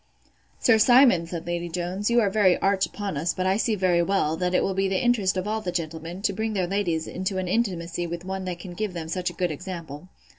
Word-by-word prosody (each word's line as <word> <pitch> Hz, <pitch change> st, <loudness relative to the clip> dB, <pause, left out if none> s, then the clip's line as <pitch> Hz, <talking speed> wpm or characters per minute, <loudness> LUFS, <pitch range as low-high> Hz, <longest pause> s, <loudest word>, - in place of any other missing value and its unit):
Sir 225 Hz, -3 st, +4 dB
Simon, 240 Hz, -8 st, +5 dB
said 170 Hz, -1 st, -6 dB
Lady 175 Hz, 0 st, -3 dB
Jones, 180 Hz, +5 st, -2 dB
you 240 Hz, 0 st, +4 dB
are 205 Hz, -, +2 dB
very 190 Hz, -3 st, +4 dB
arch 195 Hz, 0 st, +1 dB
upon 200 Hz, -7 st, -5 dB
us 165 Hz, +4 st, -1 dB
but 185 Hz, -, -2 dB
I 190 Hz, +1 st, +2 dB
see 225 Hz, 0 st, +1 dB
very 180 Hz, -3 st, +2 dB
well, 170 Hz, -4 st, +1 dB
that 180 Hz, +2 st, -1 dB
it -, -, +3 dB
will 195 Hz, -, 0 dB
be 195 Hz, +1 st, +1 dB
the 190 Hz, 0 st, 0 dB
interest 215 Hz, -7 st, +2 dB
of 185 Hz, +2 st, -2 dB
all 220 Hz, +1 st, -1 dB
the 180 Hz, -, -3 dB
gentlemen, 165 Hz, +2 st, -5 dB
to 200 Hz, -, +1 dB
bring 220 Hz, +2 st, -2 dB
their 190 Hz, -3 st, 0 dB
ladies 175 Hz, -4 st, -1 dB
into 190 Hz, +1 st, -3 dB
an 185 Hz, -1 st, -2 dB
intimacy 175 Hz, -5 st, -1 dB
with 170 Hz, +1 st, -6 dB
one 190 Hz, 0 st, -4 dB
that 180 Hz, -2 st, -4 dB
can 175 Hz, 0 st, -9 dB
give 205 Hz, +1 st, -3 dB
them 165 Hz, -2 st, -6 dB
such 180 Hz, +2 st, -1 dB
a -, -, -9 dB
good 180 Hz, 0 st, -1 dB
example. 165 Hz, -1 st, -7 dB
185 Hz, 250 wpm, -25 LUFS, 170-200 Hz, -, Simon